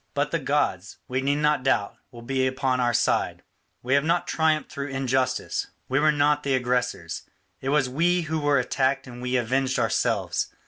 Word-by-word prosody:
But - - 0
the - - 0
gods, - - -1
we 130 +1 -1
need 140 +2 +1
not 150 -1 +2
doubt, 125 -6 +1
will 120 -1 -12
be 130 +1 0
upon 130 0 0
our 120 -1 +2
side; - - 0 0.4
we 130 +2 0
have 140 0 +4
not 170 +2 +1
triumphed 155 -1 +1
through 140 0 -4
injustice; 130 -1 -1 0.2
we 135 +2 +1
were 155 +1 +4
not 145 0 +2
the 140 -2 +1
aggressors, 125 -1 -1 0.4
it 135 - -3
was 145 -2 +2
we 170 +7 +2
who 160 -1 -2
were 145 -1 +2
attacked 130 +1 0
and 125 -1 -10
we 125 +1 -1
avenged 130 +2 +1
ourselves. - - 0
135 Hz, 185 wpm, -25 LUFS, 125-145 Hz, 0.4 s, have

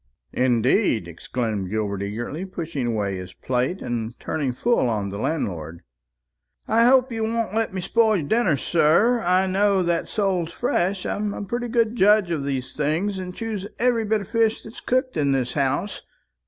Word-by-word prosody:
"Indeed!" 125 - +2
exclaimed 105 +3 -3
Gilbert 100 -2 -2
eagerly, 120 - -4
pushing 165 -8 -4
away 100 -4 -1
his 90 0 -8
plate, 130 +9 -2
and 115 0 -4
turning 145 -5 -2
full 130 - +1
on 105 -3 -1
the 100 +1 -6
landlord. 85 - -3 0.8
"I 230 +2 +4
hope 260 0 +5
you 225 -1 -2
won't 225 0 -1
let 225 0 0
me 190 0 -4
spoil 220 +3 +3
your 150 -5 -3
dinner, 210 -8 +2
sir; 175 - +3
I 185 +1 +3
know 195 0 +2
that 170 -1 0
sole's 190 -6 0
fresh. 185 +3 -1
I'm 205 0 -2
a - - -5
pretty 240 +4 -3
good 230 -1 +1
judge 205 -3 +4
of 155 -4 -1
those 130 -2 -3
things, 165 +7 -1
and 180 -1 -6
choose 215 -4 -4
every 240 -2 +2
bit 215 0 +1
of 200 - -8
fish 225 -1 +1
that's 220 - -10
cooked 255 -4 0
in 140 -2 +2
this 125 -2 -1
house. 140 +8 -1
175 Hz, 175 wpm, -23 LUFS, -, 0.8 s, hope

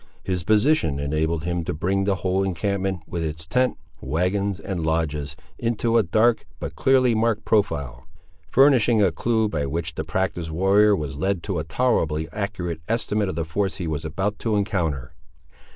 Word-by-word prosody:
His 90 -2 -2
position 105 - +3
enabled 75 +3 -1
him 85 0 -2
to - - -2
bring 95 +5 0
the 100 -1 +2
whole 95 +1 0
encampment, 95 0 -1
with 85 0 -4
its 80 0 -5
tent, 125 +9 +1 0.2
wagons, 90 +7 -1
and 90 -5 -4
lodges, 75 -3 -1 0.2
into 115 0 0
a 115 - +6
dark 110 +5 +2
but - - -6
clearly 130 -2 +3
marked 110 -1 0
profile; 70 - 0 0.4
furnishing 120 -5 +5
a 95 - +3
clue 110 +6 +1
by 75 -8 -2
which 80 +2 -3
the 80 - -3
practised 85 0 -2
warrior 100 +5 +4
was 75 -5 -4
led 95 +2 -1
to 95 -6 -2
a - - -2
tolerably 80 - 0
accurate 90 -6 -4
estimate 105 -3 0
of 95 - -4
the 85 -1 -2
force 95 +4 -1
he 90 - -4
was 80 -1 -3
about 95 +6 -2
to 110 -2 0
encounter. 80 - -1
95 Hz, 170 wpm, -23 LUFS, 80-105 Hz, 0.4 s, a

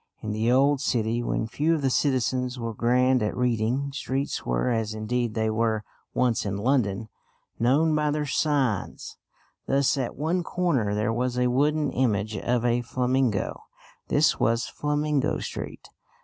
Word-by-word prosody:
In 105 - -3
the 110 +3 +1
old 135 +2 +3
city, 120 -3 0
when 120 - -1
few 150 +8 +1
of 150 - -3
the 135 - +2
citizens 125 -2 0
were 115 -2 -4
grand 125 +3 +2
at 105 - -1
reading, 125 +3 0
streets 135 0 -3
were, 60 - 0
as 110 -2 -1
indeed 115 +1 -2
they 110 -1 +1
were 110 -1 0 0.3
once 125 -2 +2
in 100 -1 -2
London, 110 -3 0 0.5
known 145 +7 +3
by 150 0 +1
their 150 0 -1
signs. 140 - -1 0.5
Thus 140 +1 +2
at 125 - -3
one 165 +6 0
corner 145 - 0
there 105 +2 0
was 125 +1 -1
a 125 0 +2
wooden 150 +3 +1
image 110 -4 0
of 120 +4 0
a 120 0 +2
flamingo; 125 -2 0 0.5
this - - +3
was 115 +1 +2
Flamingo 150 -1 0
Street. - - -6
125 Hz, 155 wpm, -26 LUFS, 110-140 Hz, 0.5 s, old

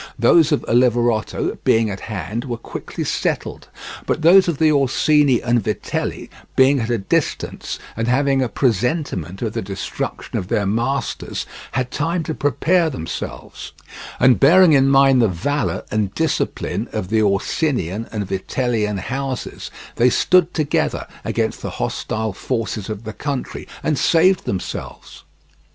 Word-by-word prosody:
Those 145 +7 +5
of 150 - +1
Oliverotto, 120 -2 +1
being 110 -1 +3
at 95 - -5
hand, 105 - -5
were 120 -3 -4
quickly 115 - -6
settled, - - -2 0.4
but - - -1
those 185 +3 +7
of 170 -4 0
the 155 0 +4
Orsini 140 -1 +3
and 120 -2 +1
Vitelli, - - -3 0.2
being 135 +1 +5
at 115 -1 -2
a 120 - +1
distance, 95 - -2 0.2
and 115 +1 -2
having 135 +2 +2
a 125 - 0
presentiment 115 - -1
of - - -2
the - - -2
destruction - - -4
of 90 - -6
their 100 +1 0
masters, 120 +6 -2 0.3
had 130 0 -1
time 165 +3 -1
to 160 - -3
prepare 165 +4 +1
themselves, 80 - -7 0.5
and 125 0 +5
bearing 170 +4 +6
in 135 -1 +5
mind 135 -2 +5
the 115 - +4
valour 125 - -2
and 105 -2 -1
discipline 160 -1 -1
of 90 - -4
the 110 0 +2
Orsinian 105 - 0
and 105 -2 -3
Vitellian 105 +1 -1
houses, 135 +4 -4 0.3
they 120 +2 +5
stood 180 +6 +3
together 155 -3 0 0.2
against - - -2
the - - -4
hostile 110 -1 -2
forces 115 -2 -3
of 110 0 -5
the 110 -1 -6
country 140 0 -4 0.2
and 150 -3 0
saved 180 +3 +3
themselves. 95 -2 -6
125 Hz, 145 wpm, -20 LUFS, 110-145 Hz, 0.5 s, those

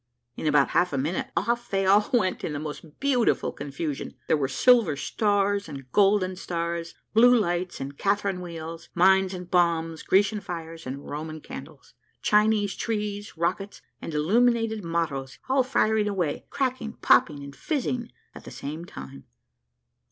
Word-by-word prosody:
In - - -3
about 145 -2 +4
half 175 -3 +2
a - - 0
minute, 150 +7 -1
off 235 +6 0
they 195 -1 0
all 205 +2 +4
went 200 -7 +1
in 150 - -2
the 145 - -3
most 155 0 -8
beautiful 265 -4 +2
confusion; 145 0 -5
there - - +3
were 140 -3 0
silver 220 - +4
stars 205 - 0
and 135 -3 -9
golden 195 -1 +3
stars, 170 -1 -3 0.2
blue 245 +3 +7
lights 175 -3 -1
and 140 +1 -6
Catherine 200 -2 0
wheels, 165 -1 -7
mines 190 +1 +4
and 180 -1 -8
bombs, 165 -2 +1
Grecian 205 +2 +2
fires 165 -5 -7
and 140 +2 -6
Roman 155 +2 -5
candles, 145 0 -11 0.3
Chinese 210 -1 +3
trees, 210 -3 -3
rockets, 185 +4 -2 0.2
and - - -5
illuminated 225 +6 +2
mottoes, 160 -6 -2
all 265 +1 +3
firing 220 -4 +2
away, 180 -7 -2
cracking, 255 -4 -2
popping, 145 -10 +3
and 140 0 -9
fizzing, 250 - -2 0.2
at - - -11
the - - -9
same 145 +6 -6
time. 70 - -10
180 Hz, 150 wpm, -26 LUFS, 155-210 Hz, 0.3 s, blue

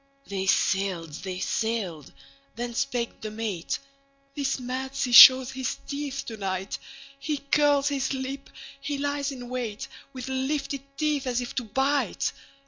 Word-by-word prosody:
They 195 -1 -3
sailed. 190 -4 +1
They 180 +5 -5
sailed. 190 - -2 0.4
Then 240 +1 -4
spake 245 -2 -2
the 215 - -4
mate:"This 275 - -4
mad 260 +2 -4
sea 255 -2 -1
shows 255 +1 +10
his 260 -1 -2
teeth 280 -1 -4
to 225 - -6
night. 190 -1 -3 0.4
He 295 +1 -2
curls 285 0 +3
his 275 -2 -1
lip, 270 +1 -4 0.3
he 280 +1 -3
lies 285 0 -1
in 250 -3 -8
wait, 240 -4 -4 0.2
With 255 -1 -7
lifted 275 +1 -2 0.2
teeth, 300 -3 0
as 245 -1 +1
if 245 - -5
to 245 - -2
bite! 270 +6 0
260 Hz, 140 wpm, -27 LUFS, 225-275 Hz, 0.4 s, shows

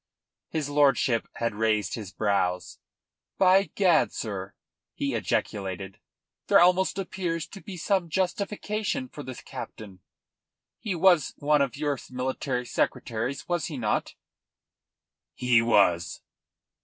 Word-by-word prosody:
His 155 -3 -2
lordship 140 -5 +3
had 115 -1 -1
raised 110 0 0
his 105 -5 -5
brows. 90 -4 -1 0.6
"By 190 +1 +5
gad, 185 -4 +4
sir," 95 -4 -5 0.4
he - - -2
ejaculated, 95 -1 -2 0.5
"there - - +6
almost 180 +2 +4
appears 180 -4 -3
to 195 - -10
be 195 -4 -8
some 180 0 0
justification 210 - -2
for 150 - -9
the 130 -2 -7
captain. 100 -5 -9 0.8
He 205 -5 -3
was 175 -3 +4
one 150 0 +3
of 140 -1 -1
your 145 -3 -1
military 130 0 -2
secretaries, 120 +2 -2
was 175 -3 0
he 155 -5 -5
not?" 110 -4 -1 1.2
"He 125 -2 +4
was." 95 -7 +2
140 Hz, 120 wpm, -27 LUFS, 110-180 Hz, 1.2 s, there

